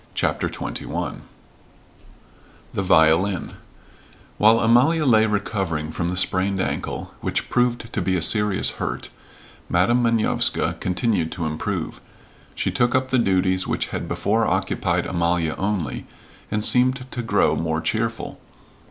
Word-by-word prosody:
CHAPTER - - 0
XXI - - -5 1.5
THE - - -1
VIOLIN 90 +1 +3 0.9
While 110 +2 +5
Amalia 135 +8 +4
lay 110 -4 +5
recovering 95 -7 -2
from 85 +1 -2
the 90 - -2
sprained 95 +1 +2
ankle, - - -3
which - - -3
proved 120 -1 0
to - - -1
be 95 - 0
a 90 - 0
serious 105 +1 +2
hurt, - - -3 0.6
Madam 100 +8 +3
Manovska 115 -2 +1
continued 90 -3 0
to 85 - -4
improve. 75 0 -4 0.5
She - - -1
took 120 0 +1
up 130 0 0
the 130 - +3
duties 95 -3 +1
which - - -2
had - - -3
before 110 +2 0
occupied 90 -2 0
Amalia 85 -2 0
only, 95 -8 -2 0.4
and 105 0 0
seemed 130 +1 +3
to 120 - -3
grow 115 - +2
more 80 -1 -1
cheerful. 110 +7 -3
100 Hz, 130 wpm, -22 LUFS, 90-115 Hz, 1.5 s, While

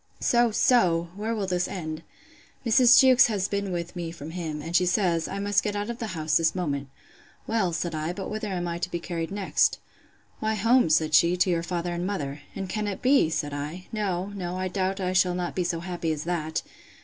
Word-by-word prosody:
So, 240 0 +3
so! 180 -7 +3
where 220 +3 -2
will 205 -3 -2
this 180 -1 0
end?—Mrs. 200 +8 +1
Jewkes 260 -1 +7
has 200 -4 -1
been 200 -1 -2
with 175 0 -4
me 170 -2 -4
from 160 -2 -8
him, 160 -3 -4
and 165 +3 -5
she 180 0 +4
says, 175 -3 +1
I 195 - -5
must 200 0 +1
get 205 -1 -3
out 205 +3 -2
of 235 - -8
the 225 - -3
house 155 -1 +2
this 165 +1 +1
moment. 140 -6 -2 0.6
Well, 215 -6 0
said 170 0 -2
I, 155 +2 -2
but 190 +2 -5
whither 215 0 -4
am 180 -3 -3
I 170 0 -3
to 180 - -2
be 175 - -2
carried 170 -1 -4
next? 200 -1 +1 0.6
Why, 220 0 0
home, 230 0 +3
said 155 0 +2
she, 170 +3 +5
to 180 +1 +2
your 170 -1 +1
father 175 0 -3
and 175 +1 -2
mother. 145 -7 -4
And 195 - -4
can 210 +2 -2
it 200 - -5
be? 260 - +4
said 145 -2 -2
I; 150 +6 -5
No, 195 -3 -2
no, 180 -2 -4
I 185 0 -2
doubt 190 +1 -1
I 185 -1 -1
shall 180 -1 +3
not 180 -1 -3
be 180 - -1
so 170 -1 -2
happy 175 -2 -3
as 150 -1 -3
that! 160 -2 -2
180 Hz, 220 wpm, -26 LUFS, 165-205 Hz, 0.6 s, Jewkes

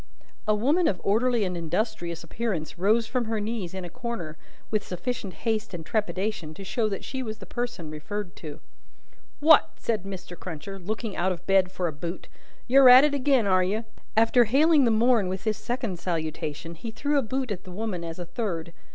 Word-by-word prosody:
A 215 - +4
woman 290 +11 +3
of 180 - 0
orderly 230 +2 +2
and 180 -2 -2
industrious 170 0 -2
appearance 175 -3 -3
rose 220 +5 +3
from 235 +2 -1
her 220 0 -1
knees 210 -4 -3
in 185 -1 -5
a - - -7
corner, 180 -9 -5 0.4
with 215 -1 +1
sufficient 190 +1 -4
haste 215 -4 0
and 165 -2 -7
trepidation 200 -5 -2
to 195 - -8
show 215 +3 0
that 195 - -4
she 265 -1 -4
was 220 -3 -5
the 200 - -11
person 240 -10 -4
referred 185 +5 -5
to. 150 -3 -8 0.8
"What!" 310 +1 +6
said 225 -4 -1
Mr. 185 -2 -7
Cruncher, 180 +3 -7
looking 215 +3 -4
out 185 +2 +1
of 180 -1 -6
bed 190 -1 +3
for 180 -2 -1
a 160 - -3
boot. 170 +5 -6 0.4
"You're 265 +1 +7
at 255 +2 +10
it 300 -1 +3
agin, 270 -4 +3
are 185 -2 +4
you?" 210 +5 -1 0.3
After 230 +2 +5
hailing 290 +5 +5
the - - +4
morn 225 -2 +3
with 190 +1 -4
this 215 -2 -1
second 240 -8 -3
salutation, 160 -1 -3
he 175 +8 -7
threw 285 +6 +1
a - - +2
boot 260 0 -2
at 185 -3 -4
the 185 - -10
woman 195 -2 -3
as 165 -1 -6
a 175 - -5
third. 170 -3 -4
205 Hz, 200 wpm, -26 LUFS, 175-235 Hz, 0.8 s, at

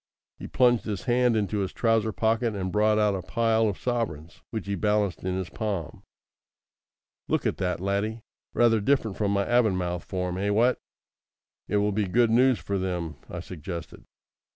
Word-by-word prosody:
He - - -7
plunged 120 -2 +3
his 105 -1 -4
hand 125 -2 +2
into 105 0 -1
his 95 -2 -2
trouser 115 -2 +1
pocket 110 +1 0
and 95 -2 -3
brought 105 +1 +3
out 105 -1 +3
a 95 - -3
pile 115 +3 +1
of 100 - -4
sovereigns, 105 -11 -3
which 110 - -4
he 100 - -2
balanced 105 -1 0
in 90 0 -1
his 95 -2 -4
palm. 100 -8 -4 1.3
"Look - - 0
at - - 0
that, 90 -2 -1
laddie. 100 +4 -2 0.3
Rather 115 -2 +4
different 115 -4 +1
from 105 -2 0
my 100 0 +1
Avonmouth 90 -7 +1
form, 90 -1 -3
eh? 100 +1 0
What?" 115 +5 +3 0.9
"It 105 - +1
will 105 0 +2
be 105 0 0
good 115 +4 +3
news 125 +1 +4
for 100 -1 -3
them," 85 -5 -3
I - - -5
suggested. 85 -1 -8
105 Hz, 175 wpm, -26 LUFS, 95-115 Hz, 1.3 s, Rather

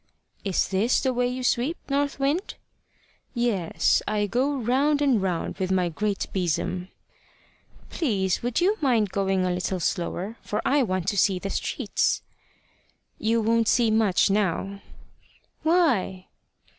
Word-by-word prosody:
"Is 195 -3 0
this 200 +6 +2
the 260 -2 0
way 245 0 +1
you 255 +1 -4
sweep, 250 +7 +1
North 280 0 -1
Wind?" 290 +8 -1 0.8
"Yes; 230 -8 +1
I 210 -1 +1
go 260 +7 0
round 270 +4 +1
and 270 -7 +2
round 185 0 -2
with 190 0 -1
my 180 -2 +2
great 205 +4 -2
besom." 180 0 -1 1.0
"Please, 195 - 0
would 245 +3 -1
you 400 +4 +2
mind 230 -8 +2
going 195 -2 0
a 180 - 0
little 180 +1 -2
slower, 180 +5 -2
for 210 - -3
I 285 +1 +3
want 185 -6 -1
to 205 - -2
see 190 0 +3
the 195 +2 -4
streets?" - - -1 1.0
"You 225 +1 +1
won't 230 +1 +2
see 235 -1 +3
much 215 -4 +3
now." 200 0 -1 0.8
"Why?" 275 - +1
215 Hz, 140 wpm, -25 LUFS, 190-255 Hz, 1.0 s, I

